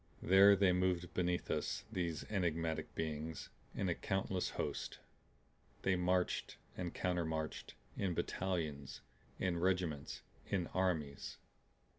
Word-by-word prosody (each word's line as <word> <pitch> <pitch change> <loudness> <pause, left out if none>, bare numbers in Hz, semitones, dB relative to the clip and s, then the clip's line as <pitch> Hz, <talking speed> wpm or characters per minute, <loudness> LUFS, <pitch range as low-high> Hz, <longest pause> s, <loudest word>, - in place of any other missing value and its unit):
There 100 +2 +8
they 95 -1 +5
moved 90 -1 +1
beneath 90 -1 0
us, 110 - -1
these 85 -6 -1
enigmatic 85 -5 -1
beings, 80 0 -3 0.3
in 95 - 0
a 90 - +3
countless 95 0 -1
host. - - -3 0.9
They 95 - +3
marched 90 0 +1 0.2
and 90 -2 -3
countermarched 80 -4 -2 0.2
in 95 -4 0
battalions, 80 -9 -2 0.4
in 90 -2 0
regiments, 90 -5 0 0.3
in 95 -3 +1
armies. 80 -7 0
90 Hz, 110 wpm, -37 LUFS, 80-95 Hz, 0.9 s, There